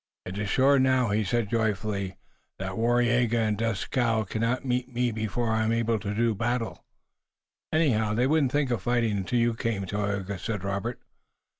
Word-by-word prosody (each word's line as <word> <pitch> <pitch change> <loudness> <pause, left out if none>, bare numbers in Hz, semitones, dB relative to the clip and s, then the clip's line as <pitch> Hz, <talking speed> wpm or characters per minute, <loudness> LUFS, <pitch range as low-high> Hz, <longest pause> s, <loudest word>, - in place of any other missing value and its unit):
"It 90 +2 -5
is 105 -2 -2
sure 135 +5 +4
now," 130 -2 +3
he 105 +2 +2
said 115 +3 0
joyfully, 105 -4 -1 0.4
"that 95 0 -4
Waraiyageh 120 +2 +2
and 110 -2 +1
Dieskau 115 +1 0
cannot 115 +6 -1
meet 125 0 -1 0.2
before 110 +2 -1
I 110 0 +1
am 110 - +1
able 115 -1 +1
to 105 -1 -4
do 115 +1 +2
battle." 115 +2 -2 0.9
"Anyhow, 110 -10 +2
they 120 +3 +2
wouldn't 145 -2 +2
think 145 -2 +1
of 115 -5 0
fighting 115 0 +1
until 100 +5 -1
you 120 0 +2
came, 110 -3 -2
Tayoga," 100 -1 -2
said 105 -2 -3
Robert. 100 +5 -3
115 Hz, 165 wpm, -27 LUFS, 105-120 Hz, 0.9 s, sure